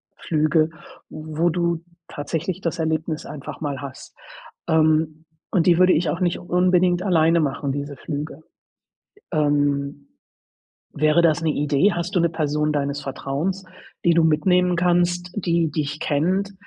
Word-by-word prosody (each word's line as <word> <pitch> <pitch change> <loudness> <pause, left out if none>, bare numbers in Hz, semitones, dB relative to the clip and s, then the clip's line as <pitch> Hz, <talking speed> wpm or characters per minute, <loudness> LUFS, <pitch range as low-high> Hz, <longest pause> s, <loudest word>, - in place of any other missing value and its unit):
Flüge, 155 0 +1 0.4
wo 155 +2 -1
du 170 -1 -1 0.3
tatsächlich 165 +5 -4
das 165 -1 -3
Erlebnis 160 0 -2
einfach 145 -2 -8
mal 145 -3 -4
hast. 135 -2 -10 0.5
Ähm, 155 0 +2 0.3
und 175 -3 +2
die 175 -2 +5
würde 185 +1 +5
ich 165 +2 +1
auch 170 - -3
nicht 175 -2 0
unbedingt 180 0 +2
alleine 165 -3 +3
machen, 140 -1 -2
diese 145 0 -5
Flüge. 150 +2 -5 0.9
Ähm, 145 -2 0 0.9
wäre 155 +3 +3
das 165 -1 +3
'ne 160 - +1
Idee? 150 +7 +2
Hast 175 +1 -3
du 180 - +3
'ne 170 - +3
Person 150 -1 0
deines 140 -1 -2
Vertrauens, 145 +7 -3 0.4
die 170 - +4
du 165 - +4
mitnehmen 180 +3 +3
kannst, 175 0 +1
die 170 -4 +1
dich 150 0 -2
kennt, 185 +7 0
160 Hz, 140 wpm, -22 LUFS, 150-175 Hz, 0.9 s, die